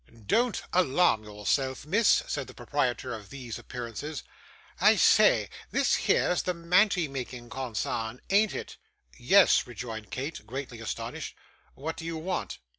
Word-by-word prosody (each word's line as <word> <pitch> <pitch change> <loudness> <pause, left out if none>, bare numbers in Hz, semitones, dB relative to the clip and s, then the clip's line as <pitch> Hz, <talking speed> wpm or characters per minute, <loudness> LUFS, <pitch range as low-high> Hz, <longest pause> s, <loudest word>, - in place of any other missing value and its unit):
'Don't 235 - +1
alarm 175 -8 +3
yourself, 125 +6 -1
miss,' 205 +8 +4
said 140 -2 -3
the - - -12
proprietor 125 -1 -1
of 105 -3 -9
these 125 -5 -7
appearances. 125 +5 -6 0.6
'I - - +6
say; - - +5 0.2
this - - +2
here's 180 - +2
the 180 - -2
mantie 180 +1 +3
making 125 -3 -7
consarn, 115 -2 -3
an't 205 +1 +3
it?' - - -6 0.4
'Yes,' - - +5
rejoined 110 -4 -7
Kate, 135 -4 -5
greatly 125 -1 -6
astonished. 115 - -5 0.4
'What 160 +4 -5
did 165 - -7
you 165 -1 -3
want? 175 +3 -3
135 Hz, 135 wpm, -28 LUFS, 120-170 Hz, 0.6 s, I